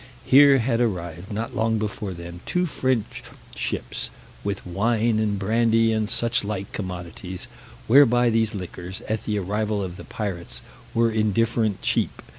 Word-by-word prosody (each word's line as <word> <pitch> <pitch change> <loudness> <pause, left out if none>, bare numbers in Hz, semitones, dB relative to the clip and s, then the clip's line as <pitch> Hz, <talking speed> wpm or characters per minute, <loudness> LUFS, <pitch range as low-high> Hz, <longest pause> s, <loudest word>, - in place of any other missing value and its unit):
Here 140 +1 +7
had 120 -1 +1
arrived, 90 -4 -2
not 110 +3 -3
long 110 0 +1
before 105 -2 -3
them, 85 0 -8
two 180 0 +1
French 130 -8 -1 0.3
ships, - - -3 0.3
with 100 -1 -3
wine 110 +4 +1
and 105 -2 0
brandy, 115 +2 +3
and 110 -1 0
suchlike 105 -4 0
commodities; 90 +1 -6 0.4
whereby 120 -1 +6
these 110 -1 +1
liquors, 90 0 -6
at 110 0 -3
the 105 -1 0
arrival 105 +1 -1
of 90 -1 -6
the - - -9
pirates, 95 -5 -5 0.3
were 115 0 +3
indifferent 110 0 +1
cheap. - - 0
110 Hz, 140 wpm, -24 LUFS, 95-115 Hz, 0.4 s, Here